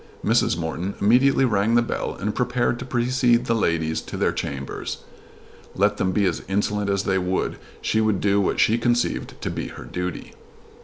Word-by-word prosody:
Mrs. - - +2
Morton 85 +4 -3
immediately 130 +6 +4
rang 110 0 +2
the 120 - +5
bell - - -3
and 105 +2 -2
prepared 125 0 0
to 125 - -6
precede 125 -1 +2
the 115 - +1
ladies 80 -7 0
to - - -7
their - - +2
chambers. 70 -1 -5 0.7
Let 100 +2 +2
them 95 - +1
be 100 +2 +2
as - - 0
insolent 105 +1 0
as 100 0 +1
they 95 -1 +1
would 90 +1 -1 0.2
she 110 - +1
would 110 -3 +1
do 100 0 +2
what 95 - 0
she 115 +2 +4
conceived 120 0 0
to - - -2
be - - -4
her - - -9
duty. 90 -1 -5
105 Hz, 185 wpm, -23 LUFS, 95-120 Hz, 0.7 s, the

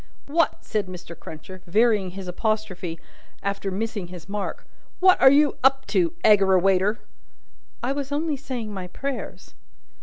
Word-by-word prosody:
"What," 330 +4 +1
said 210 -3 -1
Mr. 180 -2 -9
Cruncher, 170 +4 -10
varying 210 0 +3
his 190 +1 -8
apostrophe 185 -3 -2 0.4
after 200 0 -2
missing 205 -1 -3
his 175 -2 -10
mark 205 0 -4 0.3
"what 370 0 +5
are 265 - +9
you 290 +1 +4
up 270 0 +4
to, 340 -2 +2
Aggerawayter?" 195 0 +4 0.9
"I 250 - 0
was 280 0 -3
only 300 +1 0
saying 250 -6 -5
my 185 -2 -5
prayers." 275 +8 -6
210 Hz, 140 wpm, -24 LUFS, 185-270 Hz, 0.9 s, are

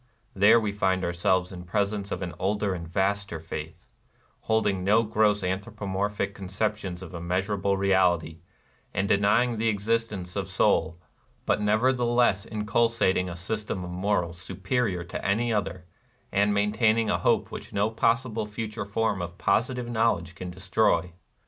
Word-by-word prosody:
There 105 +4 +6
we 105 -2 -1
find 95 -2 0
ourselves 90 +1 +1
in 90 -1 -8
presence 100 +2 -1
of - - -3
an 85 -2 -5
older 100 +1 0
and 85 -2 -6
a - - -14
vaster 95 -1 -1
faith, 80 0 -7 0.3
— - - -37
holding 105 -4 +2
no 105 +4 +4
gross 105 -2 +2
anthropomorphic 100 +1 -2
conceptions 95 -1 -3
of 90 - -9
the 85 - -6
immeas 90 +3 -1
urable 100 -1 0
Reality, 90 -4 +2 0.6
and 100 +1 +1
denying 105 +4 +3
the 115 - +1
existence 105 -3 -1
of 95 -1 -3
soul, 85 -4 +2 0.5
but 105 - +1
nevertheless 120 -1 +2
inculcating 105 -3 +1
a 85 - -6
system 105 +1 -3
of 90 - -6
morals 90 -2 -1
superior 100 -2 -1
to 85 - -6
any 115 +4 +1
other, 95 -4 -2 0.5
and 100 +1 +3
maintaining 110 +2 +2
a - - +1
hope - - +1
which - - -8
no 100 +2 +1
possible 115 -1 0
future 105 0 -5
form 105 -1 -1
of 85 0 -6
posi 115 +6 +1
tive 125 -1 -4
knowledge 110 -7 0
can 90 0 -7
destroy. 90 -1 +1
100 Hz, 155 wpm, -27 LUFS, 90-110 Hz, 0.6 s, There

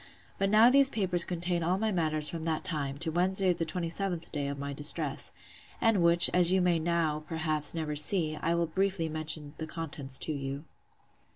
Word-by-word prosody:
But 195 - +1
now 220 +4 +6
these 275 0 +6
papers 185 -7 +3
contain 175 0 -3
all 175 +3 0
my 220 +2 -1
matters 155 -4 0
from 165 0 -5
that 160 -1 -2
time, 140 -5 -3
to 165 +1 -3
Wednesday 185 +2 +1
the 165 -1 -4
27th 175 +1 -3
day 145 -2 -3
of 140 0 -5
my 140 0 -5
distress: 145 +1 -1 0.5
And 225 -5 +2
which, 170 0 +6
as 180 -1 +5
you 190 - +3
may 175 -2 +2
now, 160 -2 -1
perhaps, 155 -2 0
never 155 -2 -3
see, 155 +1 +1
I 165 +2 -1
will 170 0 +1
briefly 185 0 -1
mention 155 -1 -5
the 160 - -5
contents 145 -5 -5
to 155 - -3
you. 140 0 -5
165 Hz, 190 wpm, -29 LUFS, 155-180 Hz, 0.5 s, now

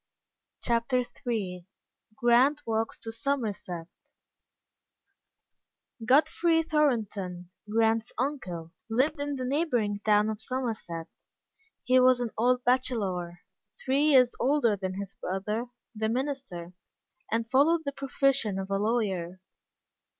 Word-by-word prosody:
CHAPTER 240 +2 +1 0.2
III 185 -6 -2 0.5
GRANT 245 +6 +4
WALKS 225 0 -1
TO 225 - -7
SOMERSET 225 - -3 2.2
GODFREY 315 +6 +3
THORNTON, 210 - -1 0.2
Grant's 225 +1 +2
uncle, 195 - -3 0.2
lived 265 +7 +1
in 285 0 -2
the 255 -1 -3
neighboring 250 -8 0
town 210 0 +3
of 215 0 -6
Somerset. 220 -10 -3 0.8
He 255 +1 +4
was 255 0 +5
an 240 -2 -2
old 250 +2 +2
bachelor, 200 -9 0 0.4
three 275 +3 +2
years 260 -5 +5
older 260 -5 +3
than 190 -1 -4
his 195 0 -6
brother, 210 +6 -3 0.3
the 220 0 -1
minister, 250 -9 -3 0.6
and 225 +1 0
followed 290 +7 +4
the 280 - -1
profession 275 -6 0
of 195 0 -5
a 195 - +1
lawyer. 195 -5 -1
230 Hz, 110 wpm, -28 LUFS, 200-265 Hz, 2.2 s, was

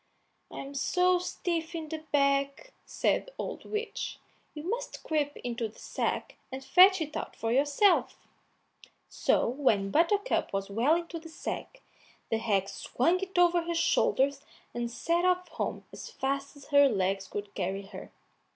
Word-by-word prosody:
"I'm 275 +1 -7
so 360 +6 +2
stiff 340 -2 -3
in 315 -2 -5
the 320 0 -4
back," 280 - +1
said - - 0
the - - -14
old - - -5
witch, 425 0 -4 0.4
"you 300 - -6
must 475 +8 -4
creep 295 -2 -1
into 235 -2 -2
the 215 - -17
sack - - -3
and 265 +1 -6
fetch 375 +2 +7
it 300 -1 -4
out - - -5
for 225 - -2
yourself." 290 - +3 0.9
So - - +2
when 225 -7 +1
Buttercup 400 - +2
was 195 0 -2
well 245 +10 +3
into 335 0 -4
the 325 0 -11
sack, - - -6 0.5
the 225 - +2
hag 200 -4 +1
swung 255 - 0
it 380 -1 -5
over 350 0 +5
her 340 0 -3
shoulders 280 -4 +2 0.3
and 240 0 -2
set 335 +8 0
off 365 0 +2
home - - -4
as - - -8
fast 275 +1 -3
as 280 - -15
her 285 -1 +6
legs 195 -2 0
could 205 0 -6
carry 195 +1 -2
her. 195 - -10
290 Hz, 160 wpm, -29 LUFS, 235-350 Hz, 0.9 s, fetch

